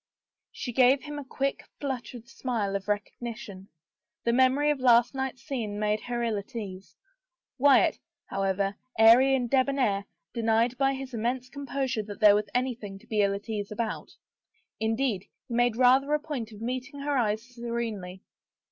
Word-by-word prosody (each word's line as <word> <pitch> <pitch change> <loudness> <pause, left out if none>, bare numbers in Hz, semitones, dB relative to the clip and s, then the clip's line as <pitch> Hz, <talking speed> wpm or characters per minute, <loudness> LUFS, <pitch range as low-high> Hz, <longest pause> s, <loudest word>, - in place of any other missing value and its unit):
She 245 - -5
gave 260 +2 +5
him 295 -1 -6
a - - -6
quick, 275 +1 -2 0.2
fluttered 250 -4 -5
smile 225 -6 -2
of 195 0 -4
recognition.. 210 -1 -5 0.6
The 235 - +1
memory 260 +4 +4
of 290 - -2
last 240 -1 +5
night's 265 -1 -4
scene 230 -8 -3
made 210 0 +1
her 240 -1 -3
ill 225 -3 0
at 205 +6 -13
ease. 195 -4 -7 0.6
Wyatt, 280 +1 +5 0.3
however, 195 0 -1 0.2
airy 240 +5 +7
and 250 -2 0
debonair, 260 -6 +1 0.3
denied 230 +1 +2
by 270 0 +2
his 265 -1 -7
im 225 - -3
mense 250 +2 -1
composure 275 -4 -2
that 205 -1 -9
there 210 -1 +8
was 210 0 0
anything 240 -6 -2
to - - -18
be 215 -2 +1
ill 200 0 +2
at 200 +3 -8
ease 210 -2 -3
about. 220 +1 -3 0.7
Indeed, 220 -3 0 0.2
he - - -6
made 240 -1 +2
rather 260 +3 +4
a - - 0
point 270 -7 -5
of 210 0 -12
meeting^ 255 +4 -4
her 290 0 0
eyes 220 -3 +1
serenely. 230 -6 -4
235 Hz, 165 wpm, -28 LUFS, 210-265 Hz, 0.7 s, there